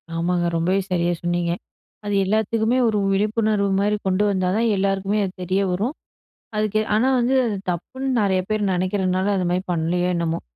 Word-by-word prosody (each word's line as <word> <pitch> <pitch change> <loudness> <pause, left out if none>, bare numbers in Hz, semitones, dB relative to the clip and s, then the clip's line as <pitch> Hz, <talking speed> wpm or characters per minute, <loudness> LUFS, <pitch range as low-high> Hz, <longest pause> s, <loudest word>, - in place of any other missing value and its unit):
ஆமாங்க 175 +1 0
ரொம்பவே 180 +4 +1
சரியாக 175 -1 +1
சொன்னீங்க. 175 0 0 0.5
அது 205 - -2
எல்லாத்துக்குமே 220 +3 +1
ஒரு 215 -2 +1
விழிப்புணர்வு 210 0 +1
மாரி 205 +1 +2
கொண்டு 190 +2 +2
வந்தா 185 -2 0
தான் 230 +1 +2
எல்லாருக்குமே 195 +1 0
அது 185 - -6
தெரிய 185 +2 0
வரும். 215 - -1 0.6
அதுக்கு 215 0 +1
ஆனா 230 +5 +3
வந்து 245 +2 +2
அது 215 -3 -1
தப்புன்னு 260 +10 -4
நெறைய 190 -3 +2
பேரு 215 -1 0
நெனைக்கிறனால, 185 +1 0
அது 185 - 0
மாரி 180 +1 0
பண்ணலையோ 175 +2 0
என்னமோ. 170 -1 -1
195 Hz, 160 wpm, -22 LUFS, 180-215 Hz, 0.6 s, ஆனா